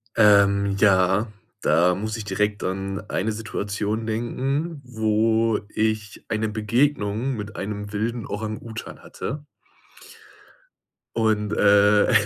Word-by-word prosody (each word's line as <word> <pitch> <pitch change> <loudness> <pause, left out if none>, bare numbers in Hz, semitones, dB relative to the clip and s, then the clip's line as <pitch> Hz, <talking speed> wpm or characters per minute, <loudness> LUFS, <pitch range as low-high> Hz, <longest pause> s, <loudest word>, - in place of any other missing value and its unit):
Ähm. 100 -2 +5
Ja, 95 +1 +4 0.3
da 90 +2 +3
muss 110 +3 -3
ich 110 - -6
direkt 105 0 -1
an 95 +1 -3
eine 110 +4 -1
Situation 105 0 -3
denken, 135 +8 -2
wo 110 -1 +1
ich 110 -1 -2
eine 110 0 -1
Begegnung 115 +2 0
mit 105 -1 -7
einem 105 0 -5
wilden 115 +2 -2
Orang-Utan 110 +1 -6
hatte. 145 +1 -6 1.7
Und, 110 -2 +1
äh, 105 +1 +5
105 Hz, 105 wpm, -24 LUFS, 100-115 Hz, 1.7 s, Ähm